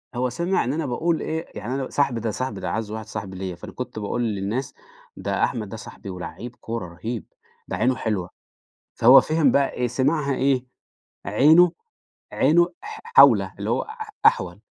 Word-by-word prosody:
هو 125 +1 0
سمع 175 +9 0
إن 130 +4 -1
أنا 160 -1 -2
باقول 160 +6 0
إيه، 160 +1 -3
يعني 120 +5 -4
أنا 135 -1 -3
صاحبي 140 -5 0
ده 110 -1 -2
صاحبي 130 +5 -4
ده - - -4
أعز 110 -1 -3
واحد 110 -1 -5
صاحب 105 -3 -6
ليّا، 95 -1 -5
فأنا 85 - -10
كنت 125 -3 -6
باقول 110 +3 -2
للناس: 110 +4 -2 0.4
"ده - - -1
أحمد 110 -4 -1
ده 110 - -7
صاحبي 100 - -10
ولعِّيب 90 +7 -7
كورة 115 -5 -5
رهيب، 110 +7 -6 0.4
ده - - -3
عينه 125 +3 +2
حلوة"، 105 -6 -2 0.7
فهو 125 +4 +8
فِهم 155 -1 +2
بقى 140 -1 +2
إيه، 125 - -1
سمعها 140 +3 0
إيه؟ 130 -1 +1 0.6
عينه 155 - +5 0.6
عينه 170 +2 +4
ح 435 +1 -8
حَوله، 465 +1 +6
اللي - - -3
هو - - +1
أح 440 0 -8 0.2
أحول. 465 +2 +3
125 Hz, 180 wpm, -23 LUFS, 110-155 Hz, 0.7 s, فهو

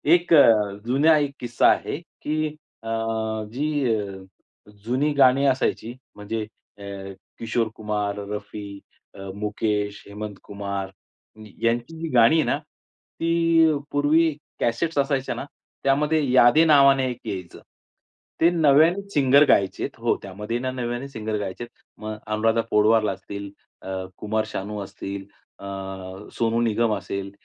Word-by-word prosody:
एक 175 -1 0
अ, 110 -9 +6
जुनं, 140 +7 +4
एक 145 -2 -1
किस्सा 120 -1 +2
आहे, - - -2
की 155 -2 -3 0.4
अ, 115 - -6 0.6
जी 140 -3 0
अ, 100 -2 -5 0.7
जुनी 130 +6 +1
गाणी 135 +1 +5
असायची, 125 -3 0 0.2
म्हणजे 105 +1 -4 0.3
अ, - - -10 0.6
किशोर 115 0 0
कुमार, 105 -1 -2
रफी, 105 -1 -7 0.4
अ, 100 - -10
मुकेश, 105 0 -2
हेमंत 105 0 -7
कुमार, 100 -1 -5 0.7
यांची 120 +6 0
जी 165 - -2
गाणी 120 +4 +6
आहे 160 - +4
ना, - - +1
ती 165 +1 0 0.2
पूर्वी 150 +3 +3 0.3
कॅसेट्स 145 +8 -1
असायच्या 135 -1 0
ना, - - -5 0.4
त्यामध्ये 150 +3 +2
यादे 130 +5 +6
नावाने 140 -3 +5
एक 120 - -8
यायचं, 95 -4 -6 0.8
ते 165 - +6
नव्याने 160 +3 +4
सिंगर 140 0 +5
गायचे 95 -1 +2
हो, - - +1
त्यामध्ये 105 +5 -4
ना 130 +1 -2
नव्याने 120 +1 -4
सिंगर 110 -4 -3
गायचे 100 +2 -5
आहेत, 120 - -15 0.2
मग 110 0 -5
अनुराधा 110 +1 +1
पोडवला 105 0 +4
असतील, 100 +1 -7 0.3
अ, 95 0 -5
कुमार 110 +1 -1
शानू 105 0 -5
असतील, 100 0 -7 0.3
अ, - - -10 0.7
सोनू 115 0 0
निगम 115 -1 +1
असेल, 100 +1 -5
115 Hz, 130 wpm, -24 LUFS, 105-140 Hz, 0.8 s, अ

